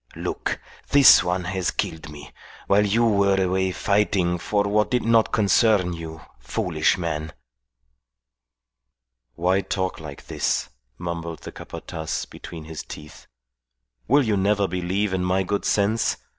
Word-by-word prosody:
"Look, - - -3 0.3
this 140 -1 +8
one 90 +1 -1
has 95 0 -2
killed 80 -1 -3
me, 75 -2 -11 0.3
while 100 +1 +3
you 115 +4 +2
were 100 -3 +3
away 95 0 +1
fighting 95 -3 +1
for 100 +4 0
what 105 +1 +1
did 125 -1 0
not 115 -1 +3
concern 100 -3 +3
you, 80 -1 -8 0.2
foolish - - 0
man." 80 -2 -3 2.0
"Why 90 +5 +1
talk 95 0 -3
like 75 -3 -10
this?" - - -1 0.3
mumbled 85 -2 -5
the - - -7
Capataz 80 -1 -6
between 80 -2 -10
his 80 0 -7
teeth. 75 +1 -11 0.8
"Will 140 +4 +4
you 110 -4 +1
never 100 +1 +2
believe 95 +3 -1
in 90 -1 0
my 95 +1 +1
good 100 +2 -2
sense? 105 +2 +1
95 Hz, 135 wpm, -23 LUFS, 85-105 Hz, 2.0 s, this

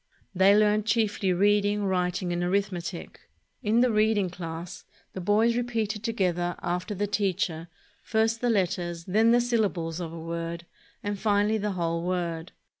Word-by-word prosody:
They 190 +2 +5
learned 210 0 +3
chiefly 210 -3 +1
reading, 205 +2 +2
writing, 180 -1 0
and 175 0 -1
arithmetic. 180 -2 -2 0.4
In 220 +3 +2
the 250 -1 +3
reading 215 -3 +2
class, 170 0 -7 0.3
the 190 - -5
boys 215 +5 +3
repeated 225 -4 -1
together 180 -6 0
after 180 +4 -2
the 205 +2 0
teacher, 190 -5 -1 0.3
first 225 +1 0
the 245 - +1
letters, 175 -5 -1
then 220 +5 +3
the 240 +1 +5
syllables 200 -9 0
of 170 -2 -5
a 165 - -7
word, 170 +1 -5 0.4
and 205 -1 -3
finally 210 +1 +2
the 210 -1 -2
whole 170 -2 -1
word. 175 -1 -3
195 Hz, 150 wpm, -27 LUFS, 175-215 Hz, 0.4 s, They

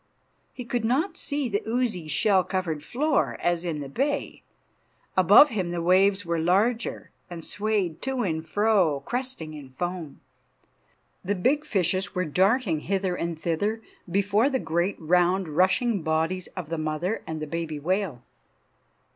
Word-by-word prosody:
He 250 - -8
could 240 -1 -2
not 270 - +1
see 285 -2 -1
the 205 -3 -1
oozy, 225 -8 -1
shell 190 +5 +3
covered 180 -6 -2
floor, 280 - 0
as 175 0 0
in 160 -4 -3
the 140 - -5
bay. 280 - -2 0.7
Above 295 - +7
him 190 -6 -2
the 175 0 -2
waves 190 +2 +3
were 170 -1 -1
larger, 205 +8 0 0.2
and 170 -2 -7
swayed 205 -6 -1
to 265 -2 -1
and 160 -5 -2
fro, 180 -5 +2
cresting 245 -11 -3
in 145 -3 -10
foam. 175 +2 -5 1.0
The 205 +3 -1
big 265 +11 +1
fishes 190 - 0
were 180 0 0
darting 190 - +2
hither 190 +2 -1
and 170 -2 -3
thither 200 +8 -1 0.3
before 200 +7 +2
the 270 - 0
great 170 -1 -1
round, 180 +3 +2
rushing 185 +7 +2
bodies 160 +4 -1
of 170 -4 -5
the 165 -1 -2
mother 155 +7 -2
and 160 -1 -4
the 155 - -3
baby 165 0 -4
whale. 175 -5 -1
185 Hz, 150 wpm, -26 LUFS, 165-220 Hz, 1.0 s, Above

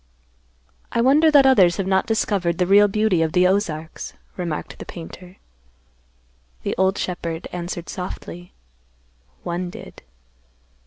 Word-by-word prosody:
"I 235 - -1
wonder 285 +6 +5
that 285 -3 +6
others 195 -10 +5
have 195 - -1
not 190 0 +1
discovered 195 -6 0
the 180 - +2
real 200 +3 +6
beauty 205 -4 +1
of 160 -1 0
the 180 0 +4
Ozarks," 170 -5 -1 0.2
remarked 170 -4 -5
the - - -6
painter. 180 +2 -10 1.3
The - - -1
old 190 +2 +1
shepherd 170 -2 -4
answered 175 -1 -5
softly, 180 -1 -7 0.9
"One 175 +1 -3
did." - - -11
180 Hz, 125 wpm, -22 LUFS, 175-205 Hz, 1.3 s, that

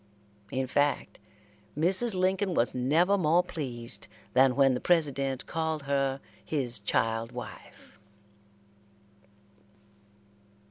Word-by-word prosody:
In 130 +3 -2
fact, 145 +2 -1 0.6
Mrs. 190 +7 +2
Lincoln 185 0 0
was 120 - +3
never 165 +10 +2
more 170 +1 +3
pleased 125 -9 -7 0.3
than 130 -1 +4
when 135 -1 +4
the 125 - -2
President 140 -6 0
called 160 -2 -3
her 135 -1 -1 0.2
his 125 -7 +1
child 115 +2 -1
wife. - - -11
140 Hz, 95 wpm, -28 LUFS, 130-170 Hz, 0.6 s, than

